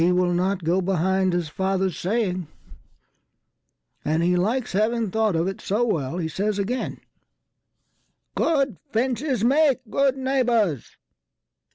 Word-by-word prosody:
He 175 - +4
will 180 0 +2
not 185 +1 0
go 175 +4 +2
behind 190 +1 +1
his 175 -2 -1
father's 190 +1 -1
saying, 185 -3 -1 1.6
And 160 +3 +1
he 180 +1 +2
likes 220 +8 0
having 220 +1 0
thought 220 -3 +1
of 165 +2 +1
it 195 - -4
so 215 +5 0
wellHe 160 - -2
says 205 +4 -1
again, 225 +6 -3 1.3
"Good 275 - +1
fences 250 +1 0
make 275 +1 +3
good 275 +3 +1
neighbours." 240 - 0
195 Hz, 125 wpm, -24 LUFS, 180-240 Hz, 1.6 s, He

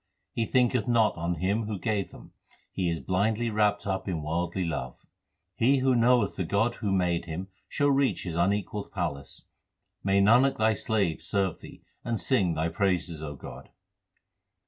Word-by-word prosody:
He 115 -2 -1
thinketh 125 -3 +2
not 115 -3 +3
on 85 +1 -2
Him 100 +7 0
who 105 -2 -3
gave 105 -1 -1
them; - - -14 0.4
he 90 -3 -1
is 85 -1 -2
blindly 110 +5 0
wrapped 105 -1 +1
up 95 0 -2
in 85 -5 -2
worldly 85 +4 -2
love. 65 -6 -5 0.5
He 135 +4 +4
who 130 0 +2
knoweth 120 -2 +3
the 95 - 0
God 100 +7 +1
who 105 -3 0
made 90 -3 +1
him 85 +4 -6 0.2
shall 145 0 +2
reach 135 -1 +1
His 85 -3 -4
unequalled 100 +3 -1
palace. 70 0 -4 0.6
May 100 0 +3
Nanak 120 +7 +5
Thy 110 0 +3
slave 100 -6 -1
serve 95 +1 -1
Thee - - -13 0.2
and 115 -1 -2
sing 95 -11 +1
Thy 80 +1 0
praises, 90 -4 -1
O 75 -2 -6
God! 65 -1 -10
100 Hz, 170 wpm, -28 LUFS, 85-115 Hz, 0.6 s, Nanak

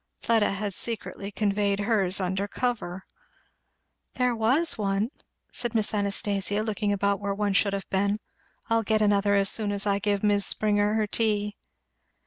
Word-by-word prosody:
Fleda 225 -3 +2
had 200 0 -3
secretly 210 -2 -4
conveyed 200 -1 0
hers 200 -4 +1
under 190 +2 -1
cover. 205 -6 -3 1.1
"There 250 -1 +1
was 260 +10 +2
one," 200 +1 0 0.4
said 240 -2 -3
Miss 215 -1 +1
Anastasia, 205 0 0
looking 210 -1 -1
about 200 0 +1
where 200 -1 -2
one 205 -1 0
should 200 0 +2
have 195 -1 -4
been, 200 +2 +1 0.5
"I'll 230 0 +2
get 215 0 +1
another 200 -1 +3
as 200 0 +3
soon 210 -2 -1
as 200 0 -2
I 200 -1 +1
give 205 0 0
Mis' 205 -1 +3
Springer 210 0 +2
her 220 -1 +2
tea." 210 -1 0
205 Hz, 155 wpm, -26 LUFS, 200-215 Hz, 1.1 s, another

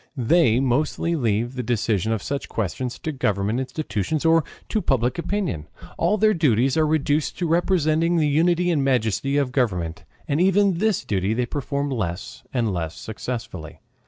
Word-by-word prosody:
They 125 -1 +3
mostly 145 +6 0
leave 120 -3 0
the 125 - -3
decision 110 -3 0
of 110 -4 -1
such 140 0 -4
questions 115 +4 -3
to 160 - -4
government 105 -4 0
institutions 140 - -2
or 165 0 +5 0.3
to 215 - 0
public 125 - 0
opinion. 170 - -2 0.3
All 210 - +1
their 215 +1 +4
duties 135 - +2
are 160 -1 +3
reduced 150 -1 0
to 175 - -1
representing 165 -1 +2
the 155 -2 +3
unity 175 +4 +2
and 150 -5 +1
majesty 130 +1 +1
of 140 -3 +1
government. 90 - -1 0.2
And 145 +4 +1
even 195 -1 +3
this 215 -9 +1
duty 100 -1 0
they 125 +1 0
perform 140 +2 -3
less 95 -7 -4
and 115 -6 0
less 80 -2 -4
successfully. 110 -8 -6
135 Hz, 160 wpm, -23 LUFS, 110-160 Hz, 0.3 s, or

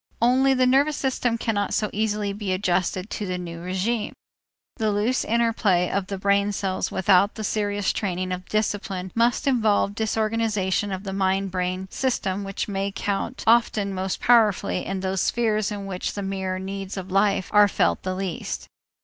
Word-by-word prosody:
Only 260 +3 +4
the 255 0 +3
nervous 280 +4 +3
system 250 -3 0
cannot 210 -3 -1
so 210 - 0
easily 210 -1 -1
be 200 -2 -2
adjusted 185 +1 -1
to 205 - -3
the 180 0 -2
new 170 -2 -6
régime. 190 +6 -2 0.6
The 220 -3 +1
loose 215 +6 +1
interplay 220 -6 +2
of 195 -2 -1
the 195 - -4
brain 200 +1 +2
cells 190 -1 -2
without 190 +2 +3
the 220 - -5
serious 205 -1 0
training 185 -2 -2
of 180 0 -5
discipline 200 -3 -2
must 235 +5 +2
involve 220 -6 +2
disorganization 215 -2 0
of 190 0 -4
the 195 -2 -5
mind 195 0 0
brain 185 +1 -2
system 200 -7 -1
which 195 0 -4
may 200 -1 -2
count 200 +5 -3
often 220 -3 +3
most 190 0 -2
powerfully 220 -6 +3
in 195 -1 -3
those 190 0 -1
spheres 215 -3 +1
in 200 -1 -5
which 185 -2 -3
the 200 - -3
mere 190 -1 -2
needs 195 +1 -5
of 190 0 -6
life 195 -1 +2
are 210 0 +7
felt - - +1
the 185 0 -3
least. 185 -3 -4
200 Hz, 170 wpm, -24 LUFS, 190-220 Hz, 0.6 s, are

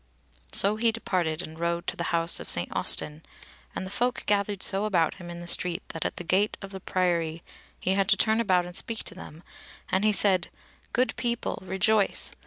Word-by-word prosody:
So 205 +2 +2
he 230 +1 +3
departed 180 -7 -1
and 160 +1 -10
rode 170 +1 -1
to - - -2
the 170 - -3
House 170 0 +4
of - - -5
St. - - -2
Austin, 150 +1 -1 0.5
and - - -3
the 190 - -8
folk 245 +4 -1
gathered 200 -1 +1
so 195 +2 +2
about 175 -6 +2
him 175 - -8
in 170 0 -7
the 175 - -8
street 175 0 +2
that 165 - -4
at - - -2
the - - -5
gate 195 +5 +1
of 195 -1 -9
the 190 - -7
Priory 170 -3 -1 0.4
he 185 - -1
had 195 0 +1
to 200 - +5
turn 220 +2 +2
about 185 -5 +2
and 175 0 -9
speak 230 +3 -3
to - - -6
them; 170 -3 -11 0.5
and 190 +2 +2
he 215 - +4
said: 190 -3 +4 0.4
"Good 255 +2 +1
people, 235 -1 -2
rejoice! 190 +2 +1
185 Hz, 205 wpm, -27 LUFS, 170-210 Hz, 0.5 s, to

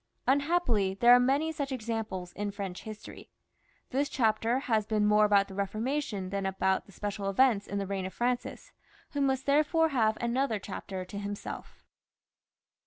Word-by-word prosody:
Unhappily, 265 - +2
there 240 +4 +7
are 245 - +8
many 275 +6 +2
such 285 -3 -4
examples 220 -7 -4
in 205 0 -3
French 195 -3 -6
history. 215 -1 -10 0.6
This 280 +2 0
chapter 225 0 +1
has 220 -5 0
been 215 -1 +1
more 210 0 +5
about 200 -1 +4
the 195 - -10
Eeformation 205 0 -2
than 200 -1 -1
about 190 0 0
the - - -15
special 205 0 -3
events 215 -1 +3
in 200 - -3
the 200 - -1
reign 190 -1 -3
of 190 - -9
Francis, 245 0 -2 0.4
who 285 - -2
must 265 -1 +1
therefore 310 +3 +3
have 220 -6 +2
another 235 0 0
chapter 190 -1 -6
to 200 +2 -7
himself. 205 0 -7
215 Hz, 165 wpm, -30 LUFS, 200-260 Hz, 0.6 s, are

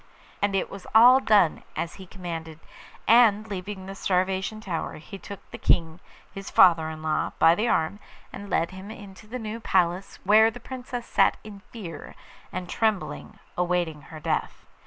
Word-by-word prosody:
And 200 -1 +1
it 190 - 0
was 195 -2 -9
all 245 +4 +8
done 205 -10 +3
as 165 - -3
he 190 - -11
commanded, 165 -4 -7 0.5
and, 220 -2 +5
leaving 195 -1 -6
the 195 - -7
Starvation 190 +2 -1
Tower, 180 -6 -4
he 195 +5 -10
took 200 +2 -10
the - - -8
King, 165 0 +1 0.3
his 195 0 -7
father 165 -4 +5
in 155 0 -8
law, 155 -1 -1
by 165 - +6
the 215 +7 0
arm, 160 -1 0 0.3
and 205 - -8
led 170 -2 0
him 190 +2 -10
into 205 -1 -11
the 245 +4 -5
new 225 -1 -5
palace, 185 -3 0
where 215 +3 +6
the 235 +2 -10
Princess 245 -1 -7
sat - - +3
in 210 -2 -10
fear 190 -8 -9 0.4
and 185 0 -5
trembling, 185 - -2 0.2
awaiting 175 -3 -1
her 160 - -9
death. 160 +1 -3
190 Hz, 170 wpm, -26 LUFS, 170-215 Hz, 0.5 s, all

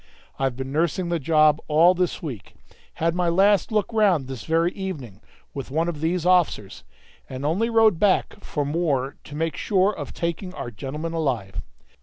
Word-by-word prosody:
I've 135 -2 0
been 130 +1 -5
nursing 170 +4 0
the 170 -1 0
job 155 +1 +3
all 165 +4 +5
this 180 -1 -2
week; 125 -10 -7 0.4
had 165 +1 0
my 175 0 +1
last 195 +5 +3
look 215 +1 0
round 195 -10 +3
this 130 -2 -7
very 165 +2 +2
evening, 150 - -7 0.3
with 135 -2 -6
one 160 +5 0
of 160 -4 -4
these 170 +1 0
officers, 175 - +1 0.5
and 130 +1 -5
only 190 +10 +1
rode 220 -6 +4
back 200 0 +1
for 145 -2 -2
more 145 -3 -1
to 145 - -9
make 165 +1 -2
sure 195 +1 +1
of - - -6
taking 170 +2 -4
our 120 - -6
gentlemen 150 +9 -5
alive. 120 - -2
165 Hz, 175 wpm, -24 LUFS, 140-180 Hz, 0.5 s, all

